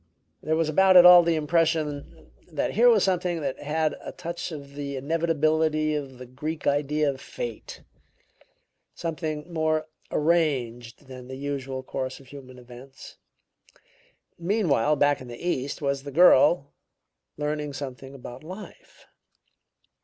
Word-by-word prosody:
There 160 Hz, -, 0 dB
was 165 Hz, -1 st, +1 dB
about 190 Hz, +4 st, +5 dB
it 175 Hz, -, +9 dB
all 180 Hz, 0 st, +10 dB
the 170 Hz, -1 st, +1 dB
impression 155 Hz, -, -1 dB, 0.2 s
that -, -, -1 dB
here 240 Hz, +4 st, +5 dB
was 220 Hz, -5 st, +4 dB
something 180 Hz, -3 st, 0 dB
that 135 Hz, -2 st, -3 dB
had 155 Hz, +1 st, -1 dB
a -, -, -6 dB
touch 170 Hz, 0 st, -6 dB
of 140 Hz, -3 st, -9 dB
the 140 Hz, -1 st, -5 dB
inevitability 155 Hz, +1 st, +1 dB
of 140 Hz, -4 st, -5 dB
the 125 Hz, -, -9 dB
Greek 150 Hz, +5 st, -6 dB
idea 145 Hz, +1 st, +1 dB
of 135 Hz, -1 st, -2 dB
fate; -, -, -7 dB, 1.1 s
something 160 Hz, -1 st, -5 dB
more 155 Hz, -1 st, 0 dB, 0.2 s
arranged 135 Hz, -7 st, -1 dB
than 130 Hz, -1 st, -11 dB
the 130 Hz, -, -7 dB
usual 135 Hz, -2 st, -4 dB
course 130 Hz, 0 st, -5 dB
of 135 Hz, -2 st, -17 dB
human 130 Hz, -3 st, -12 dB
events. 125 Hz, +2 st, -13 dB, 1.2 s
Meanwhile, 170 Hz, -, +1 dB
back 145 Hz, -1 st, +2 dB
in 130 Hz, -, -9 dB
the 120 Hz, -1 st, -9 dB
East, 145 Hz, -4 st, -3 dB
was 140 Hz, -1 st, -1 dB
the 140 Hz, +1 st, -8 dB
girl, 145 Hz, -2 st, +5 dB, 0.6 s
learning 150 Hz, -1 st, -3 dB
something 135 Hz, 0 st, -8 dB
about 125 Hz, 0 st, -10 dB
life." 185 Hz, +6 st, -12 dB
150 Hz, 140 wpm, -25 LUFS, 135-165 Hz, 1.2 s, all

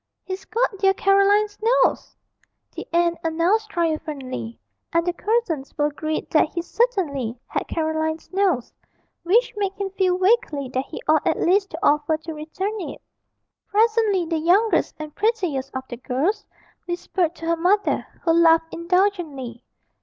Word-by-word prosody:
'He's 380 Hz, 0 st, -6 dB
got 455 Hz, -3 st, -1 dB
dear 385 Hz, -1 st, +3 dB
Caroline's 405 Hz, +2 st, +3 dB
nose!' 465 Hz, +3 st, +2 dB, 0.6 s
the -, -, -7 dB
aunt 340 Hz, 0 st, +2 dB
announced 345 Hz, +7 st, +1 dB
triumphantly, 295 Hz, -, -3 dB, 0.3 s
and 335 Hz, 0 st, +1 dB
the 355 Hz, -, 0 dB
cousins 360 Hz, -, -2 dB
were 295 Hz, -, +2 dB
agreed 310 Hz, +1 st, -3 dB
that 310 Hz, -1 st, +4 dB
he 340 Hz, -, -3 dB
certainly 315 Hz, -, -1 dB
had -, -, -3 dB
Caroline's 315 Hz, +1 st, -2 dB
nose 370 Hz, -11 st, +1 dB, 0.5 s
which 435 Hz, +8 st, +2 dB
made 395 Hz, -2 st, -1 dB
him 395 Hz, -1 st, -4 dB
feel 370 Hz, -2 st, +1 dB
vaguely 370 Hz, -, +1 dB
that 260 Hz, +1 st, -2 dB
he -, -, -8 dB
ought 310 Hz, -1 st, +3 dB
at -, -, +1 dB
least 390 Hz, +2 st, +2 dB
to 320 Hz, -, -7 dB
offer 300 Hz, 0 st, +3 dB
to 320 Hz, +1 st, -8 dB
return 380 Hz, +8 st, -4 dB
it. -, -, -6 dB, 0.7 s
Presently 435 Hz, -3 st, +2 dB
the 325 Hz, -1 st, -1 dB
youngest 380 Hz, +8 st, +2 dB
and 305 Hz, -1 st, -7 dB
prettiest 370 Hz, -, -1 dB
of 260 Hz, -, -3 dB
the 240 Hz, -, -7 dB
girls 320 Hz, -, -1 dB, 0.4 s
whispered 345 Hz, -1 st, -1 dB
to 330 Hz, -, -8 dB
her 335 Hz, 0 st, +2 dB
mother, 370 Hz, +5 st, +1 dB, 0.2 s
who 330 Hz, -, +3 dB
laughed 330 Hz, -1 st, +4 dB
indulgently. 335 Hz, -, -1 dB
340 Hz, 150 wpm, -23 LUFS, 310-400 Hz, 0.7 s, that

